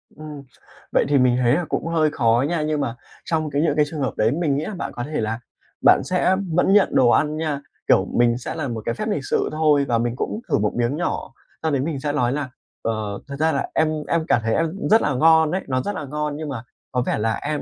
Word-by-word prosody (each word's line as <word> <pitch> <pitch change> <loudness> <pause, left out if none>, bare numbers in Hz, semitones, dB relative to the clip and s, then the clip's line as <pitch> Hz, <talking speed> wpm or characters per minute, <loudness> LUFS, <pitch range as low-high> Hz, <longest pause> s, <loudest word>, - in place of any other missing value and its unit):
Ừm, 150 -2 -9 0.5
vậy - - +3
thì 145 - +4
mình 125 -1 +3
thấy 120 -1 +3
là 175 +3 0
cũng - - -2
hơi 160 -2 +2
khó 120 -2 +2
nha, 170 -2 -1
nhưng 150 -1 -1
mà 120 -3 -2 0.3
trong 160 -3 -1
cái 145 +1 0
những 155 -3 +1
cái 150 -1 +3
trường 155 -2 -5
hợp 135 - -1
đấy 110 +2 +3
mình 150 -2 0
nghĩ 155 - -2
là 210 - -5
bạn - - -4
có 120 - -4
thể 150 -1 -3
là 110 +1 -2 0.5
bạn - - +7
sẽ 185 +1 +2 0.2
vẫn 180 +3 +3
nhận 205 - +4
đồ 120 -2 +5
ăn 150 +3 +2
nha, 150 -3 -2 0.3
kiểu - - +4
mình 120 0 +3
sẽ 125 - -6
là 155 -4 -3
một 115 -3 -5
cái 115 - -1
phép 215 - -3
lịch 145 -10 -2
sự - - +1
thôi, 150 -2 +3
và 120 -2 +2
mình 120 +1 -1
cũng 210 - -3
thử - - +3
một 105 0 +1
miếng 120 +4 0
nhỏ 175 - -3 0.3
sau 160 - +1
đấy 135 -2 +1
mình 145 -2 -2
sẽ 145 +1 -2
lói 125 -4 +1
là: 145 -3 -3 0.3
"Ờ, 110 -3 -3
thật 140 - -6
ra 160 +1 +3
là - - -2
em 160 - +2 0.2
em 170 -1 +1
cảm 120 - +3
thấy 115 - 0
ăn 165 -1 +1
cũng - - -3
rất 220 +1 +6
là 145 - 0
ngon 160 +2 +5
ấy, 185 +1 -1
nó 130 -1 0
rất 205 +5 -3
là 150 - -4
ngon, 150 +1 -3
nhưng 155 -2 -5
mà 120 -4 -5 0.3
có 125 - 0
vẻ - - 0
là 110 +1 0
em 150 0 -3
145 Hz, 275 wpm, -22 LUFS, 120-160 Hz, 0.5 s, bạn